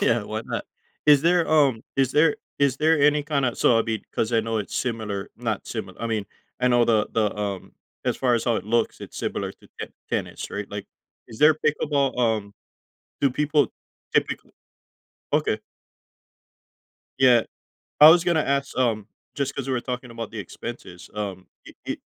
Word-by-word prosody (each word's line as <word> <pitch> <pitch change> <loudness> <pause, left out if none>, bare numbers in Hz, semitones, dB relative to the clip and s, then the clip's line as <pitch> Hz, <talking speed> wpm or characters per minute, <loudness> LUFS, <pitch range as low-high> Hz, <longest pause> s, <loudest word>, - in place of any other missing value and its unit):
Yeah, - - +2
why - - -4
not? - - -4 0.4
Is 145 -1 +7
there, 175 0 +3
um 140 -7 +3
is 135 -2 +2
there 150 0 +4 0.2
is 140 -2 +2
there 160 0 +3
any 150 +1 +4
kinda 140 -5 0
so, 120 - +4
I'll 115 - +3
be 110 -1 -2
'cause 110 +1 -1
I 115 - +4
know 115 0 -2
it's 105 - -5
similar 110 -5 -3
not 115 -4 -3
simil 100 -5 -6
I 115 - -3
mean, 110 -3 -2 0.3
I 125 - +3
know 120 -1 +4
the 110 -3 +2
the, 110 -2 +1
um, 100 -2 -4 0.3
as - - 0
far 125 -2 +2
as 115 - 0
how 120 -3 +2
it - - -4
looks, 115 +2 0
it's - - -10
similar - - -3
to - - -22
ten - - -6 0.2
tennis, - - -3
right? 100 0 -5
Like, 100 -1 -6 0.4
is 110 - -11
there 155 +1 +7
pickleball, 145 -3 0
um 110 -4 0 0.7
do 140 -2 +3
people 150 +2 +1 0.4
typic - - +2 1.0
Okay. - - +1 1.6
Yeah, 125 -3 +6 0.6
I 150 +1 +11
was 170 +1 +6
gonna 165 -3 +2
ask, 140 -1 -1
um, 110 -5 +1 0.3
just 140 -1 -2
'cause 135 -1 -4
we 130 - 0
were 125 - +1
talking 125 -1 -5
about 115 -1 -6
the 110 - -6
expenses, 100 -2 -8
um, 100 -3 -5 0.2
i - - -12
i - - -2
120 Hz, 180 wpm, -24 LUFS, 110-140 Hz, 1.6 s, I